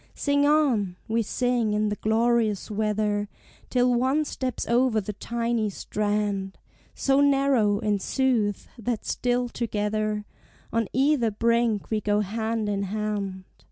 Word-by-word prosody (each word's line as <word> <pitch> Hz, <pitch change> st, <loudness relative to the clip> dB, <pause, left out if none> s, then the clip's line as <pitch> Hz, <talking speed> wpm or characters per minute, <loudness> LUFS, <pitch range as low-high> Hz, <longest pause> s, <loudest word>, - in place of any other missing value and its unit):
Sing 285 Hz, 0 st, +2 dB
on! 255 Hz, -12 st, +2 dB
we 230 Hz, +1 st, +1 dB
sing 240 Hz, -1 st, 0 dB
in 210 Hz, 0 st, +1 dB
the 210 Hz, -, -1 dB
glorious 220 Hz, -1 st, +1 dB
weather, 210 Hz, -1 st, 0 dB, 0.4 s
Till 250 Hz, 0 st, +3 dB
one 260 Hz, +5 st, +2 dB
steps 260 Hz, -3 st, -3 dB
over 240 Hz, -1 st, +3 dB
the 210 Hz, +1 st, -5 dB
tiny 230 Hz, +1 st, -1 dB
strand, 205 Hz, -1 st, -2 dB, 0.4 s
So 275 Hz, 0 st, +2 dB
narrow, 275 Hz, -7 st, +3 dB
in 210 Hz, -1 st, 0 dB
sooth, 225 Hz, -3 st, 0 dB
that 230 Hz, -1 st, -3 dB
still 245 Hz, 0 st, 0 dB
together 215 Hz, -2 st, -2 dB, 0.5 s
On 230 Hz, -2 st, +1 dB
either 265 Hz, -3 st, +2 dB
brink 230 Hz, 0 st, +1 dB
we 215 Hz, -1 st, +1 dB
go 210 Hz, 0 st, +1 dB
hand 220 Hz, +2 st, -2 dB
in 200 Hz, -1 st, -1 dB
hand. 200 Hz, -1 st, -3 dB
220 Hz, 130 wpm, -26 LUFS, 210-245 Hz, 0.5 s, Till